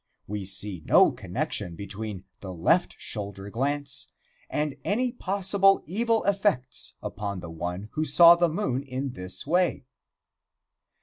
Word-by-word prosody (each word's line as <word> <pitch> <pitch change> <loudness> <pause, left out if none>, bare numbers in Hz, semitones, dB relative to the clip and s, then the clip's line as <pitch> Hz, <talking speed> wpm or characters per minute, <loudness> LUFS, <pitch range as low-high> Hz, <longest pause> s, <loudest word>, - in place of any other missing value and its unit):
We 105 -1 -5
see 95 -1 0
no - - +6
connection 85 - -4
between 100 0 -6 0.2
the 95 - -7
left 85 -2 +2
shoulder 100 -1 -6
glance 140 +3 -2 0.4
and 150 -2 -1
any 245 +5 0
possible 195 -3 +3
evil 225 +6 +1
effects 190 -11 0
upon 100 -2 -4
the 85 -1 -8
one 90 +5 -5
who 155 - -1
saw 170 +3 +8
the 170 0 +2
moon 155 -7 -1
in 135 0 -4
this 90 -5 -6
way. 175 -2 +1
130 Hz, 130 wpm, -27 LUFS, -, 0.4 s, saw